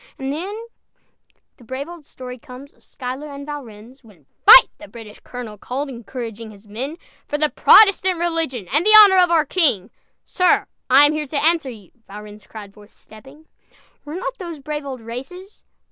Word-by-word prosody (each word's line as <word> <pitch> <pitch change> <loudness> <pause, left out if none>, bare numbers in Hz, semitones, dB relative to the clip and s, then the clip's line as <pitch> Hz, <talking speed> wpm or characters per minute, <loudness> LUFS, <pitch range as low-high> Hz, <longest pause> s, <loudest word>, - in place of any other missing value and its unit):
And 270 +1 -4
then 400 +9 -6 0.9
the 245 - -19
brave 260 +5 -6
old 340 -4 -13
story 250 -1 -10
comes, 255 +4 -13
Of - - -30
Schuyler 260 +3 -7
and 280 -1 -9
Valrennes, 255 -3 -11
When 195 - -21 0.2
"Fight" - - +10
the - - -12
British 215 0 -13
colonel 230 -5 -10
called, 275 +6 -5
Encouraging 230 -2 -8
his 210 0 -17
men, 260 +10 -6 0.3
"For 295 - -3
the 305 0 +1
Protestant 380 -3 +5
Religion 330 - -3
And 300 +4 +2
the 430 +2 +7
honor 390 -3 +7
of 360 -1 +4
our 325 -3 +2
King!" 275 - 0 0.3
"Sir, 365 -1 +1 0.2
I 275 +3 +7
am 295 - +1
here 305 -1 -4
to 285 +1 -2
answer 325 -4 +1
you!" 210 -7 -13 0.2
Valrennes 210 0 -12
cried, 205 -3 -11
forthstepping. 220 +8 -18 0.6
Were 295 +2 -8
not 405 +7 -6
those 340 -4 -7
brave 295 0 -6
old 260 -3 -7
races? 270 - -10
275 Hz, 175 wpm, -20 LUFS, 230-325 Hz, 0.9 s, Fight